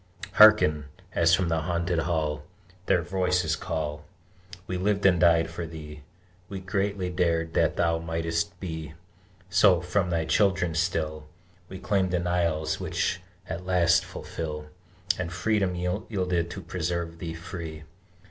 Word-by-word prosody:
Hearken, 105 -9 +7 0.3
as 85 0 +4
from 90 -2 -1
that 80 -1 0
haunted 85 0 0
Hall 80 -3 -1 0.5
Their 85 - +3
voices 90 -3 +1
call: 80 -4 -4 0.6
"We 90 - -4
lived 100 +2 0
and 90 -3 +5
died 85 -1 +4
for 85 0 -5
thee; 75 -2 -9 0.5
We 100 - -5
greatly 95 0 -2
dared 85 -2 0
that - - +2
thou 85 -1 +1
might'st 85 +1 -2
be: 80 -4 -6 0.6
So, 90 -1 +5
from 90 +2 0
thy 85 -2 0
children 95 -4 +2
still 80 -2 -1 0.4
We 95 - -7
claim 95 -1 0
denials 85 -3 0
which - - -1 0.3
at 90 +2 -6
last 85 -1 +4
fulfil, 75 -3 -6 0.5
And 90 -2 -3
freedom 95 0 0
yielded 90 -1 -1
to 95 - -7
preserve 85 -1 -3
thee 80 -1 -5
free!" 85 -2 -7
85 Hz, 135 wpm, -27 LUFS, 80-90 Hz, 0.6 s, Hearken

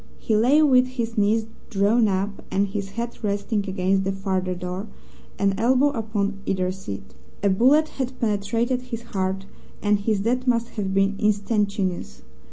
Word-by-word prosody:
He 220 - 0
lay 260 +8 +5
with 255 -3 +5
his 235 -3 -4
knees 215 +1 +2 0.2
drawn 215 +2 +3
up, 195 +1 -2
and 195 +1 +1
his 195 0 -4
head 235 0 -5
resting 205 0 -1
against 190 +1 +1
the 195 - 0
farther 190 -1 -1
door, 180 +3 -5 0.5
an 200 -1 +2
elbow 260 +5 +4
upon 210 -5 -2
either 185 -1 0
seat. 100 - -8 0.3
A 200 - +4
bullet 270 +10 +4
had 260 -3 -5
penetrated 230 +4 0
his 235 -2 -6
heart 195 -3 -2 0.3
and 205 -1 +2
his 205 -1 0
death 250 +4 0
must 235 -1 +2
have 200 -3 -3
been 195 0 +2
instantaneous. 200 - 0
205 Hz, 160 wpm, -24 LUFS, 195-235 Hz, 0.5 s, lay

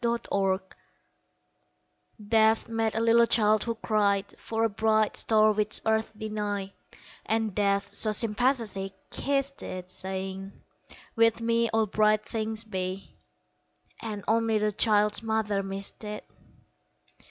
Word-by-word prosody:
Laureate 195 -5 -1 1.6
DEATH 220 0 +3
met 225 -1 -1
a - - 0
little 230 +1 +4
child 215 -2 +3
who 230 -1 -2
cried 205 -3 +1
For 225 0 -2
a - - +4
bright 215 0 +1
star 215 -1 +4
which 210 0 +2
earth 220 0 +1
denied, 205 -2 -4 0.5
And 220 -2 -1
Death, 200 0 0
so 215 - +3
sympathetic, 215 -3 0 0.2
kissed 275 0 -1
it, 185 0 -7
Saying: 190 +1 -5 0.6
"With 230 -1 +3
me 230 0 +1
All 220 0 +1
bright 215 +1 +2
things 220 0 -2
be!" 190 -2 -5 0.9
And 210 -3 -6
only 225 0 +2
the 210 0 0
child's 210 0 +2
mother 220 -3 -1
missed 195 +2 -6
it. 210 0 -6
215 Hz, 120 wpm, -27 LUFS, 200-225 Hz, 1.6 s, little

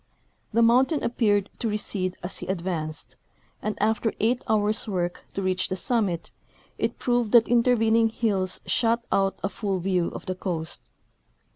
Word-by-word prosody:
The 230 +1 +3
mountain 260 +6 +4
appeared 205 -4 +1
to 235 - -1
recede 200 -3 0
as 175 - -4
he 180 - -7
advanced, 170 -4 -3 0.4
and 215 - -3
after 220 +1 +1
eight 235 +3 +2
hours' 215 +1 +2
work 175 -3 -2
to 195 - -3
reach 185 0 0
the 185 - -1
summit, 190 -6 0 0.5
it - - -1
proved 240 -4 0
that 235 -1 +8
interven 235 -2 +3
ing 225 -1 +4
hills 200 -5 0
shut 235 0 +1
out 195 -1 +2
a - - +2
full 200 -2 -2
view 180 -1 0
of - - -7
the 185 - -2
coast. 165 - -4
205 Hz, 160 wpm, -25 LUFS, 185-230 Hz, 0.5 s, that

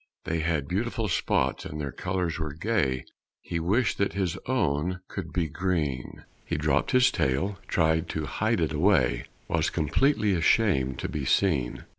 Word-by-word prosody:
They 80 0 -1
had 80 -3 0
beautiful 110 - -1
spots 90 - 0
and 75 - -6
their 70 -2 -3
colors 90 -1 -2
were 80 -2 -3
gay 80 - 0 0.3
He 85 - -4
wished 105 +8 +1
that 100 - +1
his 95 -4 -1
own 90 - 0
could 85 -5 -6
be 85 -3 0
green; 80 -6 -2 0.2
He - - -2
dropped - - +1
his 125 -1 +5
tail, 90 +10 0
tried 80 0 +1
to 80 -1 -2
hide 70 - 0
it - - 0
away; 80 -4 +2 0.2
Was - - +1
completely 105 - +2
ashamed 80 - +2
to - - -2
be 75 - -4
seen. 70 -4 +1
85 Hz, 160 wpm, -27 LUFS, 75-100 Hz, 0.3 s, his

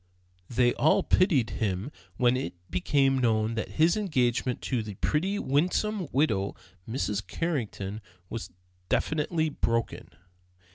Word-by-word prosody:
They 120 0 +3
all 155 - +3
pitied 155 - +3
him 100 +4 -1 0.3
when 125 0 +4
it 130 -7 -3 0.2
became 135 +7 +2
known 110 -2 +2
that 110 -1 -4
his 160 +2 +4
engagement 130 - 0
to 125 -4 0
the 105 -2 -7
pretty 185 - 0
winsome 185 +5 0
widow, 110 -9 +1 0.3
Mrs. 105 -4 -1
Carrington, 110 - -3 0.3
was 100 -4 -6 0.4
definitely 155 +1 +1
broken. 115 -5 -1
130 Hz, 115 wpm, -28 LUFS, 110-155 Hz, 0.4 s, when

